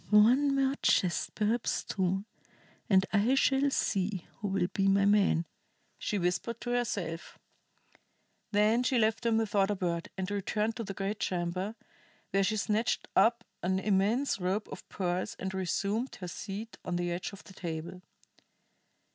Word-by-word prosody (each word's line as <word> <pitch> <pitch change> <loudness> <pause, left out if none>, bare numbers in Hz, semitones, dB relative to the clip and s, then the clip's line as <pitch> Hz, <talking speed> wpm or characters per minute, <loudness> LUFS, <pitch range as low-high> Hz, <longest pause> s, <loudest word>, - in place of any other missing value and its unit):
"One 250 +7 +5
more 270 0 +2
chest, 180 -2 +2
perhaps 220 +3 0
two, 190 0 -1 0.6
and 190 -2 +5
I 220 +6 +4
shall 270 +1 +3
see 195 -7 -1
who 210 - -2
will 195 -2 +1
be 195 0 +2
my 195 0 +4
man!" 200 -5 +3 0.5
she 210 - -1
whispered 180 +6 -1
to 245 - -3
herself. 200 -9 -2 1.1
Then 215 +3 +4
she 250 0 +1
left 220 +1 +2
them 230 -2 +2
without 205 -3 +2
a 205 - +1
word, 170 -3 -2
and 190 +1 -3
returned 210 +2 -1
to 230 - -3
the 195 -2 -6
great 200 +2 -3
chamber, 185 +4 -2 0.6
where 195 0 +3
she 215 +3 +1
snatched 215 +2 0
up 235 +1 +4 0.2
an 185 +1 +1
immense 205 +7 +1
rope 190 +4 -1
of - - -10
pearls 180 -1 -2
and 190 0 -4
resumed 200 +6 -1
her 180 - -7
seat 205 +5 -6
on 175 - -2
the 175 0 -1
edge 175 +5 -3
of 200 - -11
the 190 - -14
table. 170 0 -5
200 Hz, 155 wpm, -31 LUFS, 185-225 Hz, 1.1 s, One